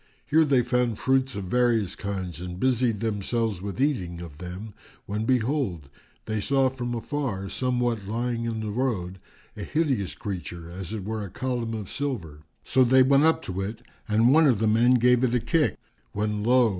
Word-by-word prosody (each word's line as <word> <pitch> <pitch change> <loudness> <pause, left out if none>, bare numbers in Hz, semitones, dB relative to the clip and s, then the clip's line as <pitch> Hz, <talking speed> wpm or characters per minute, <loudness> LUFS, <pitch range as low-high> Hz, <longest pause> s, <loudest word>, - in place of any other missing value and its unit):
Here 160 +2 +4
they 135 -4 +3
found 125 -2 0
fruits 130 -1 +1
of 100 - -4
various 115 -1 +1
kinds 95 -5 -5
and 90 0 -6
busied 125 -4 +1
themselves 110 -2 -1
with 100 +3 -5
eating 95 - 0
of 80 -4 -9
them, 95 +4 -7 0.3
when 105 +2 -2
behold, 120 - 0 0.4
they 110 -1 -2
saw 135 +3 +2
from 120 -2 -4
afar, 115 -6 -3
somewhat 120 -4 -1
lying 115 +2 -2
in 115 -1 -2
the 105 -1 -3
road, 100 -7 -2 0.4
a - - -7
hideous 135 - 0
creature 85 -5 -6
as 90 +1 -6
it 110 -3 -4
were 110 0 -3
a 100 - -6
column 120 +1 -3
of 105 -3 -5
silver. 100 - -4 0.2
So 130 - +3
they 130 +1 +6
went 140 +3 +4
up 160 - +3
to 95 +1 -4
it 105 +3 -5 0.2
and 115 +4 +4
one 160 0 +6
of 125 -6 +4
the 110 - 0
men 115 +4 +4
gave 125 +1 +4
it 125 -1 +2
a - - +3
kick, 120 - +1 0.4
when 105 0 -1
lo! 125 0 +4
115 Hz, 185 wpm, -26 LUFS, 100-130 Hz, 0.4 s, they